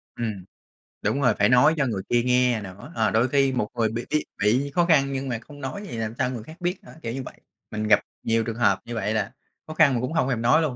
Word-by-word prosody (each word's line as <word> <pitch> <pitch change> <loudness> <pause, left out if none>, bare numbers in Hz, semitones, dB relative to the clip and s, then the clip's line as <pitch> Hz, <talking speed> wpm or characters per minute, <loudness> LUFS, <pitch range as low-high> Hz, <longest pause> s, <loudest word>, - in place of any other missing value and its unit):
Ừm, 105 -6 -4 0.6
đúng 140 - 0
rồi, 125 -4 +4
phải 100 - +4
nói 125 +6 +6
cho 145 - +2
người 105 -5 -2
kia 120 0 +3
nghe 125 -2 +2
nữa, 95 0 -10
ờ, 110 -2 +2
đôi 115 +3 +3
khi 135 0 +3
một 125 -5 0
người 115 -2 +1
bị 115 +2 -4
y 150 - +1 0.2
bị 125 +8 +2
khó 175 - +4
khăn 140 -5 +3
nhưng 135 0 -3
mà 115 -3 -2
không 145 +3 -13
nói 135 +9 -5
thì 120 - -6
làm 110 0 -3
sao - - +1
người 120 -4 -5
khác 160 +8 -13
biết 180 +2 -2
nữa, - - -13
kiểu 115 -6 -4
như 135 - -4
vậy. - - -12 0.3
Mình 110 0 -2
gặp 105 - +6 0.2
nhiều 115 0 +1
trường 115 -1 -4
hợp 120 - +3
như 120 - -6
vậy 105 -1 -1
là 105 -3 -1 0.4
khó 155 - -6
khăn 155 -4 +5
mà - - +1
cũng 125 +5 -3
không 160 -5 +1
thèm 125 -4 -1
nói 125 +8 +4
luôn 145 -6 -1
125 Hz, 280 wpm, -25 LUFS, 110-140 Hz, 0.6 s, nói